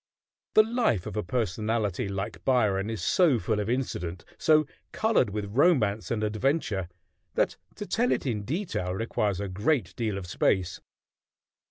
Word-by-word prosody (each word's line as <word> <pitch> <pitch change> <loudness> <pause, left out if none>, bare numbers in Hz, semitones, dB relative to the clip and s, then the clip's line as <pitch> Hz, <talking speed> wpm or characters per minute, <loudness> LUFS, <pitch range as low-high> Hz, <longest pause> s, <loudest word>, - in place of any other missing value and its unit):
The 215 - +8
life 220 - 0
of - - -6
a 105 - 0
personality 110 -1 -1
like 100 +2 -4
Byron 105 -6 +2
is 110 -6 -4
so 170 - +4
full 110 -1 -1
of 105 +1 -2
incident, 90 -9 -3
so 155 -1 +4 0.3
colored 220 - +2
with 105 +1 -3
romance 125 - +3
and 110 -2 -1
adventure, 110 - 0 0.5
that - - +1 0.2
to 205 - -6
tell 240 +4 +1
it - - 0
in 115 -6 -1
detail 125 - -2
requires 105 -2 -1
a 100 - -2
great 105 - 0
deal 110 -4 -2
of 95 - -5
space. 90 0 0
110 Hz, 155 wpm, -27 LUFS, 100-135 Hz, 0.5 s, The